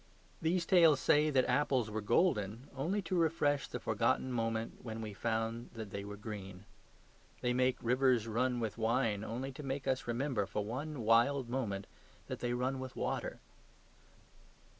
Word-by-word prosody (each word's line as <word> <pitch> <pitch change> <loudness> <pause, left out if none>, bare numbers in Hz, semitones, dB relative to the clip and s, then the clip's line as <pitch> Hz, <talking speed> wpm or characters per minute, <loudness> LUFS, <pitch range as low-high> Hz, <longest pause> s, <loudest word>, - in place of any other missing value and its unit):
These 170 +2 +1
tales 165 -6 +6
say 150 +3 +4
that 130 -3 +3
apples 130 -6 +1
were 110 +1 -2
golden 115 - +1
only 180 +10 -1
to 180 +2 -2
refresh 155 -4 +2
the - - -5
forgotten 130 - +1
moment 115 -1 -2
when 115 -2 -5
we 110 -2 -5
found 115 +2 -2
that 110 -3 -6
they 100 +1 -4
were 100 0 -7
green. 100 -3 -7 0.8
They 125 0 +1
make 125 0 +2
rivers 125 -1 +3
run 120 +2 0
with 110 -1 -3
wine 110 -2 +1
only 125 +5 -4
to 135 - -9
make 135 -1 -3
us 130 -2 0
remember, 120 -4 0
for 105 - -2
one 135 +5 -4
wild 120 +4 +3
moment, 105 -6 -2 0.4
that - - -5
they 120 0 -1
run 130 +2 -1
with 130 -1 -6
water. - - -3
120 Hz, 160 wpm, -34 LUFS, 110-135 Hz, 0.8 s, tales